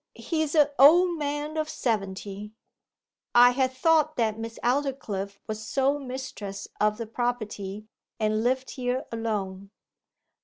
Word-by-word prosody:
He's 315 -2 -2
a' 295 -2 +5
old 340 +4 +7
man 295 +1 -3
of 310 0 -1
seventy.' 205 -3 -3 0.8
'I 245 +1 +8
had 260 0 +1
thought 310 +3 +2
that 225 -2 0
Miss 225 0 -6
Aldclyffe 240 -7 -1
was 215 0 -5
sole 275 +5 +1
mistress 250 -7 -6
of 210 0 +2
the 230 - -4
property, 215 -4 -3 0.3
and 215 0 +1
lived 260 +2 0
here 255 +1 -2
alone. 200 -4 -3
245 Hz, 125 wpm, -27 LUFS, 210-280 Hz, 0.8 s, I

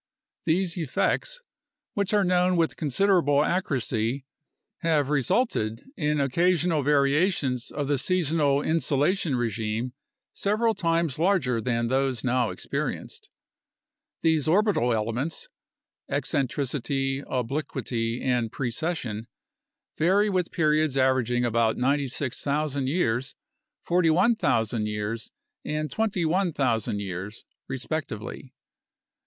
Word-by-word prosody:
These 175 +1 +1
effects, - - -1 0.5
which 200 -2 0
are 205 -2 +3
known 180 0 +2
with 165 -1 +1
considerable 155 -2 +2
accuracy, 130 - -1 0.5
have 155 -4 +1
resulted 135 - 0
in 150 - 0
occasional 165 +3 +2
variations 140 -2 +2
of 145 -1 -3
the 145 -2 +1
seasonal 155 -4 +1
insolation 160 0 +1
regime 115 +1 -2 0.4
several 215 +3 +1
times 165 -6 0
larger 160 - +2
than 115 0 0
those 130 -1 0
now 125 -2 +1
experienced. - - -4 0.9
These 160 -3 +2
orbital 185 - +3
elements 120 - -2 0.6
(eccentricity, 135 -1 -1
obliquity, 125 -3 -2
and 125 -4 0
precession) 120 -4 -3 0.7
vary 200 +6 +3
with 180 -2 0
periods 155 -3 +2
averaging 125 -2 +2
about 115 -1 +2
96,000 140 +1 -1
years, 130 -5 0 0.5
41,000 165 - +2
years, 105 +2 -3 0.3
and 150 -1 -3
21,000 165 - 0
years, 95 +2 -6 0.2
respectively. 130 -3 -5
140 Hz, 90 wpm, -26 LUFS, 120-170 Hz, 0.9 s, are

